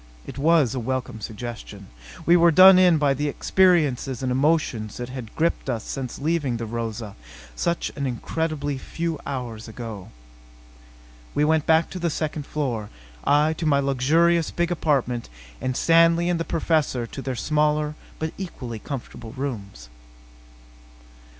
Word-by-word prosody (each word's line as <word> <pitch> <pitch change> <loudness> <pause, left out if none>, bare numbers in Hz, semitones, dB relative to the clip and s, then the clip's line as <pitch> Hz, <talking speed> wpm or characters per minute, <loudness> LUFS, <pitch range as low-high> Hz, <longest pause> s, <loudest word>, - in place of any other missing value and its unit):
It - - -8
was 155 -4 +3
a 130 - -2
welcome 125 -2 -3
suggestion. 105 -2 -7 0.4
We 170 - +6
were 170 0 +6
done 185 +3 +8
in 180 -3 +5
by 145 -2 +2
the 145 +2 -2
experiences 145 -8 +2
and 130 - 0
emotions 130 -6 0
that 120 0 -5
had 125 -4 -8
gripped 165 -3 0
us 115 -3 -2
since 130 -3 -5
leaving 145 -5 0
the 115 - -4
Rosa 115 -2 -5 0.4
such 170 0 -1
an 140 -2 -2
incredibly 145 +2 -3
few 165 +2 -4
hours 120 -5 -5
ago. 110 -4 -8 1.3
We 150 - +3
went 155 -1 +2
back 160 0 +3
to 185 - -5
the 170 -1 0
second 150 -1 -3
floor. 120 -8 -3 0.4
I 150 +2 +3
to 160 0 -3
my 140 -2 +4
luxurious 155 +5 +2
big 175 0 -1
apartment 135 -8 0 0.3
and 130 -1 -2
Stanley 165 +1 +4
and 175 -1 0
the 165 - -2
Professor 155 -7 0
to 135 - -8
their 130 -1 -3
smaller 150 +2 +1 0.2
but 160 0 -3
equally 125 - -6
comfortable 120 -3 -7
rooms. 105 - -6
140 Hz, 150 wpm, -24 LUFS, 120-160 Hz, 1.3 s, done